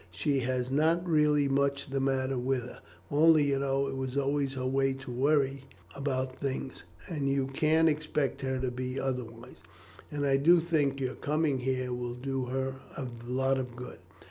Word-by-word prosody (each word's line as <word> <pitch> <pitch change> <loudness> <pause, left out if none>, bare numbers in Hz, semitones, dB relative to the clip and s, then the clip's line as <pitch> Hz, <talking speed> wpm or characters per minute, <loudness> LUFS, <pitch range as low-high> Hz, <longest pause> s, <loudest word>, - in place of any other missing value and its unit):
She 120 - 0
has 125 0 -1
not 165 +5 +2
really 150 -3 +3
much 140 0 0
the 135 - 0
matter 135 0 0
with 130 0 0
her; 125 - -10 0.3
only 155 +1 +6
you 140 -1 +1
know 135 0 +1
it 135 - -4
was 130 0 -3
always 140 -1 0
her 130 -1 -3
way 135 +1 +2
to 130 -1 -8
worrit 135 +1 +2 0.3
about 130 -2 -2
things, 135 -1 -4 0.3
and 145 -7 -1
you 135 -1 +1
can't 155 +4 +3
expect 150 -3 0
her 130 -1 -1
to 130 -1 -1
be 130 +1 -4
otherwise, 120 -3 -4 0.5
and 145 -2 -2
I 135 -1 +4
do 170 +5 +6
think 150 -5 +1
your 130 -1 -2
coming 150 -2 0
here 130 0 -1
will 120 0 -4
do 135 +1 -3
her 130 +1 -2 0.2
a 135 - -3 0.2
lot 130 +1 +1
of 125 -2 -5
good." 125 +1 -8
135 Hz, 180 wpm, -30 LUFS, 130-145 Hz, 0.5 s, only